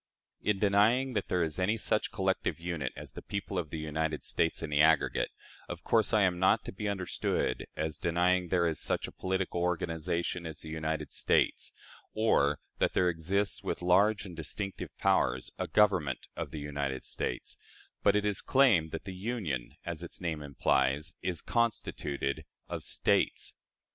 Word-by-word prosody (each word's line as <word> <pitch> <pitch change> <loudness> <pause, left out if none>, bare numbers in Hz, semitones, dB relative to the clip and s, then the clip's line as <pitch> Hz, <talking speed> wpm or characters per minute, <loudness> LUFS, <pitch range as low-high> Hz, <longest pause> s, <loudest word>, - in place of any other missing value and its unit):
In 105 -2 +1
denying 110 +6 +3
that 105 -3 -1
there 90 -1 +1
is 80 0 -3
any 100 +5 +2
such 110 0 0
collective 95 -5 0
unit 85 -6 -3
as - - -9
the - - -8
people 100 -1 -3
of 80 -4 -4
the 80 - -5
United 80 0 -2
States 80 0 0
in 80 - -4
the 75 0 +4
aggregate, 80 -1 +3 0.4
of - - -6
course 110 -2 +3
I 110 -3 +4
am 90 -2 +2
not 95 +4 +3
to - - -4
be 105 +2 -3
understood 95 -3 -1
as 80 0 -3
denying 90 +2 +2
that - - -12
there 90 -2 +3
is 80 - -1
such - - 0
a - - -9
political 95 -2 -2
organization 85 0 -1
as 80 - -7
the 80 - -8
United 80 0 -3
States, - - +1 0.4
or 75 -10 +3 0.2
that - - +2
there 90 -1 +3
exists, 90 +5 0
with - - -3
large 100 +3 +4
and 90 -3 -8
distinct 95 +5 -5 0.2
powers, - - +2
a - - -1
Government 95 - +2
of - - -4
the 80 - -7
United 70 -2 -3
States; - - -3 0.5
but 100 - +4
it 105 0 +2
is 105 -1 +1
claimed 115 -13 +4
that 80 - -5
the 95 - -6
Union, 90 - -3
as 85 -1 -4
its 85 - -5
name 80 -4 -2
implies, 70 +1 +1
is 90 -2 -2
constituted 75 - -1 0.2
of - - -4
States. - - +1
90 Hz, 175 wpm, -31 LUFS, 80-100 Hz, 0.5 s, the